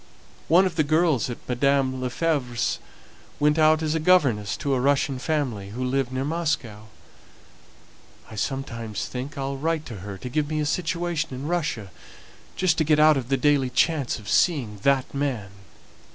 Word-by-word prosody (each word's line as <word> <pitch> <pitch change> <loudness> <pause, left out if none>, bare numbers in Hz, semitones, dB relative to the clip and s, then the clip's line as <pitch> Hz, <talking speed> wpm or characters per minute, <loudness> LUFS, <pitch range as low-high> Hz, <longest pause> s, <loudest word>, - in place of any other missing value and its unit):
One 175 +4 +5
of 180 -3 -3
the 155 - +4
girls 155 -4 +2
at 120 - -8
Madame 130 0 +1
Lefevre's 125 -2 -1 0.6
went 150 +2 +3
out 155 0 +4
as 155 -1 0
a 160 - 0
governess 140 - +3
to 140 -1 -1
a 130 - +1
Russian 135 0 +1
family, 125 -10 -2
who 120 +5 -5
lived 130 0 0
near 130 +1 -2
Moscow. 145 -10 -2 1.4
I - - -12
sometimes 115 -3 -3
think 130 +3 -6
I'll 135 0 -3
write 160 +2 -1
to 115 - -7
her 100 +1 -7
to 125 - -7
find 150 +2 0
me 155 0 -2
a 150 - 0
situation 165 -2 -1
in 130 +3 -6
Russia, 150 - -2 0.6
just 180 -3 +1
to - - +4
get 150 0 +3
out 155 0 +6
of 130 -2 -3
the 135 - +2
daily 140 -1 +2
chance 140 +1 +1
of 105 - -12
seeing 120 - +1
that 135 0 +1
man!" 130 -8 -2
140 Hz, 170 wpm, -24 LUFS, 125-155 Hz, 1.4 s, out